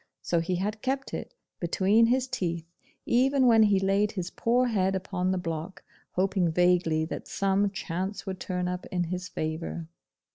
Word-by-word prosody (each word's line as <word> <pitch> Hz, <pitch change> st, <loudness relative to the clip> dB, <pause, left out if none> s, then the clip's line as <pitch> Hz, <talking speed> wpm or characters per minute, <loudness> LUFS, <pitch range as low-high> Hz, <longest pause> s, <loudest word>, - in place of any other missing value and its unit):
So 170 Hz, -, +1 dB
he 170 Hz, +2 st, -1 dB
had 210 Hz, +4 st, -2 dB
kept 270 Hz, +1 st, -2 dB
it -, -, -6 dB, 0.2 s
between 200 Hz, +6 st, +3 dB
his 255 Hz, +2 st, +2 dB
teeth, 170 Hz, -8 st, -2 dB, 0.4 s
even 265 Hz, +2 st, +3 dB
when 230 Hz, -2 st, +6 dB
he 205 Hz, -2 st, +5 dB
laid 195 Hz, +2 st, +1 dB
his 180 Hz, -3 st, -4 dB
poor 245 Hz, +2 st, +2 dB
head 195 Hz, -5 st, +1 dB
upon 185 Hz, -1 st, -2 dB
the 190 Hz, -, 0 dB
block, 165 Hz, +1 st, -5 dB, 0.3 s
hoping 185 Hz, -2 st, +1 dB
vaguely 175 Hz, -2 st, +3 dB
that -, -, -6 dB
some 195 Hz, +1 st, +1 dB
chance 190 Hz, +1 st, -4 dB
would 190 Hz, -2 st, -5 dB
turn 180 Hz, -1 st, -2 dB
up 180 Hz, 0 st, -4 dB
in 180 Hz, -1 st, -1 dB
his 180 Hz, +1 st, -4 dB
favour. 160 Hz, +1 st, -4 dB
190 Hz, 170 wpm, -28 LUFS, 175-210 Hz, 0.4 s, when